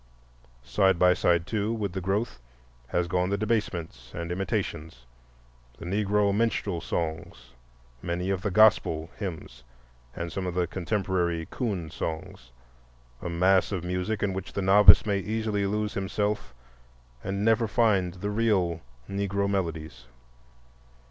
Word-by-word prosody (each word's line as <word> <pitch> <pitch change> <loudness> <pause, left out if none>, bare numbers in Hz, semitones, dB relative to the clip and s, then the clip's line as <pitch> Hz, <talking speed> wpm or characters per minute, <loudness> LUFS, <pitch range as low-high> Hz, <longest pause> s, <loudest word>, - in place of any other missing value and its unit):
Side 95 +8 +2
by 90 +1 +5
side, 85 -2 +2
too, 105 +1 -1
with 105 -5 -2
the 95 - -3
growth 100 - -1 0.5
has 85 +5 0
gone 90 +1 0
the 100 - 0
debasements 85 - -2
and 85 +1 -4
imitations—the - - -6
Negro 100 +1 +1
"minstrel" 105 -5 0
songs, 80 -6 -4 0.5
many 90 +2 -2
of 95 -1 -1
the 105 - -1
"gospel" 90 -6 +3
hymns, 80 - -6 0.5
and 85 0 -4
some 95 +2 -3
of 90 - -4
the 90 -1 +2
contemporary 90 -2 -1
"coon" 95 - -3
songs,—a - - -9
mass 90 +3 +3
of 95 -4 -2
music 90 +4 -2
in 100 -2 0
which 95 0 -6
the 100 - -2
novice 100 +3 +8
may 100 -2 +1
easily 105 -1 -1
lose 105 +1 -1
himself 105 - -2 0.7
and 100 +1 -2
never 115 0 +3
find 100 -6 +2
the 100 +3 -4
real 100 -7 +1 0.3
Negro 100 0 -1
melodies. 80 -9 -3
95 Hz, 130 wpm, -27 LUFS, 85-100 Hz, 0.7 s, novice